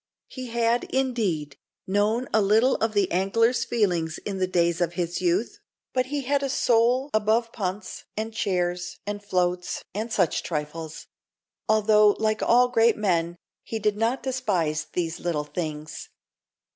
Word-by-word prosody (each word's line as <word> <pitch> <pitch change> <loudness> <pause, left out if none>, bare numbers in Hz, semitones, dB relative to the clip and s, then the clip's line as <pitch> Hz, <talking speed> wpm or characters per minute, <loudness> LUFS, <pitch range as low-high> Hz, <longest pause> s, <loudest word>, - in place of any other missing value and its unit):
He 255 -1 -7
had, 235 0 +1
indeed, 210 - -1 0.3
known 210 +6 +1
a 220 - +4
little 220 +6 +4
of 220 0 -1
the 200 -3 +1
angler's 230 +6 +2
feelings 175 -9 0
in 195 -2 -3
the 185 - +1
days 170 -1 +1
of 175 -1 0
his 175 0 -2
youth, 185 +5 0 0.3
but 255 0 +1
he 285 +1 -2
had 275 +2 0
a 275 - -1
soul 250 +2 +2
above 220 +2 +1
punts, 195 -1 -4
and 220 +1 -3
chairs, 175 -3 -1
and 205 0 -4
floats, 180 -2 -1
and 220 +4 -4
such 185 -7 +1
trifles; 155 0 -5 0.6
although, 215 -1 +5
like 215 0 0
all 245 +1 +5
great 230 -2 +3
men, 175 -5 0 0.3
he 225 - -5
did 210 -1 0
not 230 +5 0
despise 190 - -1 0.3
little 165 -4 -1
things. 155 0 -6
205 Hz, 145 wpm, -25 LUFS, 175-230 Hz, 0.6 s, although